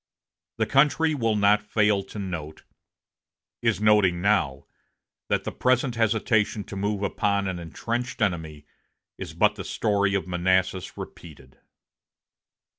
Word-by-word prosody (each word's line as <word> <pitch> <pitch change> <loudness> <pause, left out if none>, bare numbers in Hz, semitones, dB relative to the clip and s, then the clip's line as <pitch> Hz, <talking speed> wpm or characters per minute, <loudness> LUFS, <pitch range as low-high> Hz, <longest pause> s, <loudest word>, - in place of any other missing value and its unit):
The - - +1
country 150 +3 +3
will 115 -6 0
not 105 0 +4
fail 105 -1 +1
to 100 - -11
note 85 -6 -6 1.0
is 115 -3 +1
noting 105 -5 +3
now 80 -9 +1 0.6
that - - +1
the - - -4
present 130 0 +1
hesitation 110 -2 +1
to 100 - -9
move 100 +1 -2
upon 100 0 0
an 95 -2 -3
intrenched 120 +9 -4
enemy 80 -7 -2 0.5
is - - -7
but - - +3
the - - -7
story 100 -2 0
of 95 - -1
Manassas 95 +1 0
repeated." 70 -6 -11
100 Hz, 125 wpm, -25 LUFS, 90-110 Hz, 1.0 s, not